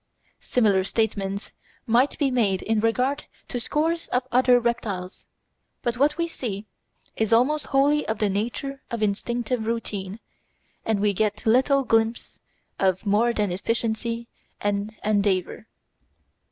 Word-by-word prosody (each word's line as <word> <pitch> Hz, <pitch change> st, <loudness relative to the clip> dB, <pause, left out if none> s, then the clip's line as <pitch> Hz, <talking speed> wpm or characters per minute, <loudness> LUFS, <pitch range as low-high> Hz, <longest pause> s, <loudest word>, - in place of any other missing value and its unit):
Similar 205 Hz, -6 st, +2 dB
statements 200 Hz, -2 st, -1 dB, 0.3 s
might 245 Hz, +5 st, +3 dB
be 280 Hz, -3 st, +1 dB
made 205 Hz, -7 st, +1 dB
in 220 Hz, -1 st, +1 dB
regard 250 Hz, +6 st, +1 dB, 0.2 s
to 245 Hz, -, -2 dB
scores 325 Hz, +7 st, -1 dB
of 250 Hz, +1 st, -1 dB
other 250 Hz, 0 st, +5 dB
reptiles; 210 Hz, -6 st, -3 dB, 0.6 s
but 240 Hz, 0 st, 0 dB
what 290 Hz, +4 st, +2 dB
we 335 Hz, 0 st, 0 dB
see 220 Hz, -10 st, -5 dB, 0.5 s
is 220 Hz, 0 st, 0 dB
almost 265 Hz, +6 st, +3 dB
wholly 285 Hz, +2 st, +2 dB
of 220 Hz, -, -1 dB
the 210 Hz, -, +1 dB
nature 240 Hz, +7 st, -3 dB
of 230 Hz, -2 st, -2 dB
instinctive 225 Hz, +2 st, -1 dB
routine, 210 Hz, -3 st, -3 dB, 0.7 s
and 220 Hz, -3 st, +1 dB
we 205 Hz, -1 st, +2 dB
get 210 Hz, +1 st, -1 dB
little 265 Hz, +4 st, +4 dB
glimpse 225 Hz, -1 st, 0 dB, 0.4 s
of 190 Hz, +1 st, +1 dB
more 210 Hz, +4 st, +3 dB
than 210 Hz, -4 st, 0 dB
efficiency 230 Hz, +4 st, -2 dB, 0.3 s
and 205 Hz, +1 st, -2 dB
endeavour. 200 Hz, -3 st, 0 dB
225 Hz, 130 wpm, -25 LUFS, 205-250 Hz, 0.7 s, other